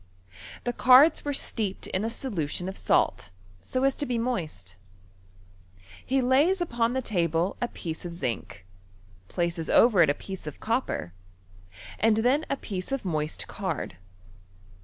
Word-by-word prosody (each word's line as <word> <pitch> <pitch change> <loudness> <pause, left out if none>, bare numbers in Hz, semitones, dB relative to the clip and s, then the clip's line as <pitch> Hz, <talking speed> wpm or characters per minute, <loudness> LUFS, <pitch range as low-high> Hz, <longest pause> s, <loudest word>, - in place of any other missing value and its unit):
The 245 - -1
cards 260 +7 +6
were 290 - -2
steeped 215 -7 -2
in 190 - -2
a 225 - -1
solution 185 - -3
of 190 - -5
salt, 85 - +1 0.3
so 255 - -2
as 275 0 +4
to 290 - -2
be 245 -1 -1
moist. 160 - -3 1.3
He 265 0 +1
lays 290 +10 +3
upon 235 -8 0
the 260 0 -1
table 170 -3 0
a 240 - +1
piece 160 -8 -6
of 175 - -5
zinc, 115 - -5 0.6
places 170 - -2
over 220 -7 +6
it 160 - +5
a 145 - +2
piece 190 -2 -8
of 150 - -7
copper, 230 - -2 0.9
and 220 0 +3
then 255 +7 +2
a 275 - 0
piece 190 -1 -5
of 275 -6 -2
moist 155 -3 -2
card. 170 - -4
210 Hz, 150 wpm, -27 LUFS, 165-255 Hz, 1.3 s, cards